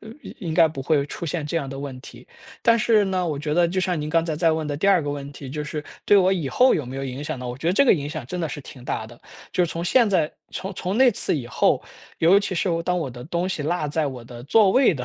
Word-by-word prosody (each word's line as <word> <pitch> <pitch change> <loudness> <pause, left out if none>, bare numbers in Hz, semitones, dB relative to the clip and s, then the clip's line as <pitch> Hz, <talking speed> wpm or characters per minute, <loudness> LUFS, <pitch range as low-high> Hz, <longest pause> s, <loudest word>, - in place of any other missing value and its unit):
呃， 220 - -12
应 - - -10
应 165 -6 -3
该 165 -1 +6
不 140 -3 -6
会 140 -1 +1
出 170 - -7
现 160 -1 -3
这 165 - -2
样 140 -5 -2
的 135 - -6
问 140 -2 -6
题”。 120 -2 -13 0.4
但 230 0 +4
是 215 -2 +3
呢， 185 -2 -1
我 150 -4 -2
觉 150 +1 -2
得 175 +1 +4
就 185 +2 -1
像 180 -2 0
您 150 0 -4
刚 165 +1 +3
才 160 -2 -2
在 165 +1 +3
问 160 -1 -2
的 145 -1 -3
第 165 - -1
2 190 -4 +4
个 145 - -4
问 140 -1 -5
题， 140 -1 -9
就 150 +3 -4
是 150 0 -5 0.2
对 - - +4
我 190 -1 +4
以 170 -7 -1
后 255 - +4
有 150 - -1
没 130 +2 -7
有 135 - -3
影 135 +2 -5
响 135 - -4
呢？ 125 - -6
我 120 - -5
觉 150 +5 -6
得 175 - +3
这 280 - +4
个 - - +7
影 145 -3 -4
响 155 -6 -6
真 180 +7 -5
的 165 - 0
是 145 +1 -6
挺 130 -2 -12
大 110 -3 -3
的， 120 +2 -14 0.3
就 180 - +2
是 170 - -3
从 165 - -3
现 235 +5 +4
在 170 -6 +1 0.2
从 190 0 -5
从 190 +5 -2
那 260 -1 +6
次 - - 0
以 135 -6 -3
后， 120 - +1 0.4
尤 180 +5 +6
其 200 -2 -3
是 185 - 0
当 180 +1 0
我 160 -5 -3
的 120 0 -9
东 175 +4 -2
西 190 -5 -3
落 155 0 -1
在 155 +1 0
我 130 -3 -6
的 120 0 -11
座 205 +6 +4
位 255 +3 +4
的 130 -6 -5
160 Hz, 325 characters per minute, -23 LUFS, 140-180 Hz, 0.4 s, 个